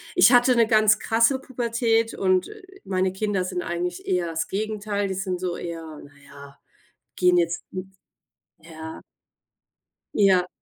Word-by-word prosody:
ich - - +6
hatte 245 0 +5
'ne 230 -2 +4
ganz 215 -1 +4
krasse 230 +4 +2
Pubertät 230 -3 0
und, 185 -1 +1
äh, 430 0 -12 0.2
meine 185 -1 -1
Kinder 200 -1 -1
sind 180 -1 -3
eigentlich 175 +1 -4
eher 180 -2 0
das 165 -1 -3
Gegenteil, 205 0 -2
die 190 - -3
sind 185 -1 -3
so 180 -2 -3
eher 165 -3 -7
na 145 - -15
ja, 140 0 -14 0.6
gehen 180 0 +3
jetzt, 170 0 0
n 190 +1 -8 0.7
ja. 160 -1 -9 1.1
Ja. 190 -3 +4
190 Hz, 145 wpm, -24 LUFS, 175-220 Hz, 1.1 s, ich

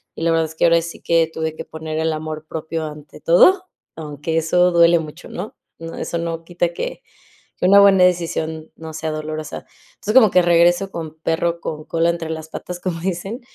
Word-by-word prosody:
y - - -5
la 165 - +2
verdad 165 0 +2
es 160 - -13
que, - - +2
ahora 170 0 +5
sí 170 +1 -8
que 165 -1 +2
tuve 160 -1 -3
que - - -7
poner 160 0 -5
el 160 0 +1
amor 155 0 -5
propio 160 0 -4
ante 150 -1 -10
todo, 370 - +5 0.3
aunque 155 +1 -4
eso 180 +3 +3
duele 170 0 +5
mucho, 155 +1 -9
¿no? 190 +5 -7 0.2
No, 165 0 -7
eso 170 - -3
no 165 -1 -4
quita 175 0 -1
que - - -5 0.5
que 180 - +1
una 200 +2 +8
buena 195 -2 +6
decisión 160 -3 -1
no 160 0 -9
sea 160 0 -3
dolorosa. 155 0 -5 0.3
Entonces, 215 +4 -4
como 220 -7 +7
que 180 - +5
regreso 175 +2 +3
con 160 -3 -6
perro 170 +1 -1
con 155 -1 -5
cola 165 +1 +1
entre 170 -1 -3
las 160 0 -6
patas 180 +2 -7
como 175 -2 -3
dicen, 190 +6 -3
165 Hz, 205 wpm, -20 LUFS, 160-175 Hz, 0.5 s, una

